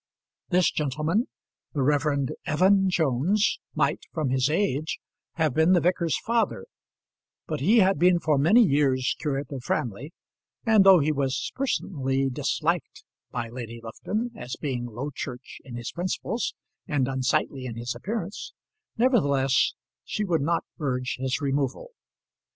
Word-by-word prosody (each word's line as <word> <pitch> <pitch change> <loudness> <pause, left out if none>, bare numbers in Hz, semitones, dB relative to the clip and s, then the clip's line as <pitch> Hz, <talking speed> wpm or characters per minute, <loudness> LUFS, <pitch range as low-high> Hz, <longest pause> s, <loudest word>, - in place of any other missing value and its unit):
This 180 -2 +3
gentleman, 155 - 0 0.5
the 140 - 0
Rev. 145 -1 +1 0.2
Evan 190 +5 +4
Jones, 165 - +1 0.2
might, - - +1
from 155 -6 -1
his 130 +1 +2
age, 155 -3 0 0.4
have 155 -5 +1
been 160 +5 +4
the 180 - +5
vicar's 170 -2 +1
father; 225 - 0 0.8
but - - -3
he 200 - +4
had 190 -4 +3
been 180 +1 +5
for 150 -4 +1
many 205 - +6
years 135 - +2
curate 140 -2 -2
of 135 -3 -5
Framley; 120 +7 -2 0.5
and 220 -3 +6
though 195 -1 +8
he 155 -1 +2
was 135 -3 -1
personally 135 - -1
disliked 125 - -1 0.3
by 120 -2 -3
Lady 115 -1 -7
Lufton, 215 - -3
as 125 0 -6
being 125 -5 -3
Low 125 +6 -5
Church 125 -1 -7
in 125 -3 -9
his 120 0 -5
principles, 185 +6 -2 0.3
and 140 -4 +1
unsightly 130 0 0
in 115 - -6
his 120 +1 -3
appearance, 205 -2 -5 0.4
nevertheless, 140 - +3 0.3
she 210 - -3
would 170 -6 +1
not 165 +4 0
urge 130 -4 -2
his 130 +3 -1
removal. 140 - -1
145 Hz, 140 wpm, -26 LUFS, 130-180 Hz, 0.8 s, though